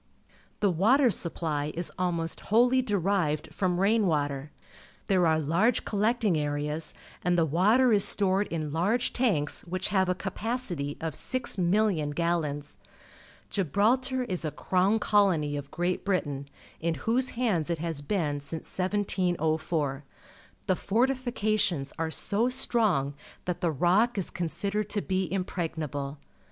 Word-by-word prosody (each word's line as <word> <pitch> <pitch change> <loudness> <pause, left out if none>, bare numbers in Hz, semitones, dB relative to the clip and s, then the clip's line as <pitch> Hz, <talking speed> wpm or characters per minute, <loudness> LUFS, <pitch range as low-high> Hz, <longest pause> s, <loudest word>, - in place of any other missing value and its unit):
The 200 -2 +3
water 235 - +4
supply 155 -4 0
is 170 +1 -2
almost 170 -2 -2
whoUj^ 245 +4 +4
derived 185 -7 0
from 180 -2 0
rain 210 +1 +3
water. 145 -3 -1 0.6
There 185 -3 +3
are 160 0 +3
large 170 - +1
collecting 210 -4 +1
areas, 150 +2 -2 0.3
and 175 0 +2
the 165 - +4
water 215 - +4
is 200 -2 +4
stored 195 0 +1
in 155 -3 -4
large 205 +10 +1
tanks 195 - +1
which 185 +3 -3
have 190 -2 +2
a 180 - +1
capacity 190 - -3
of 160 -1 -3
6,000,000 185 - 0
gallons. 155 -4 -2 0.7
Gibral 205 - +2
tar 260 0 -1
is 185 -8 -3
a 155 - -1
crown 185 +7 +1
colony 190 -9 +2
of 140 -1 -5
Great 175 +3 -1
Britain, 145 -8 -2 0.3
in 165 0 -1
whose 250 +3 +2
hands 195 -11 +1
it 170 - 0
has 160 -2 -3
been 150 -3 -1
since 150 +3 -7
1704. 170 -7 -1 0.6
The 185 - +2
fortifications 215 - 0
are 165 0 0
so 210 +8 +1
strong 215 - +1 0.3
that 180 -1 -3
the 175 - +2
Rock 185 - +2
is 190 - 0
considered 200 +4 -2
to 205 0 -1
be 185 -3 -1
impregnable. 160 -6 -3
180 Hz, 135 wpm, -28 LUFS, 155-210 Hz, 0.7 s, water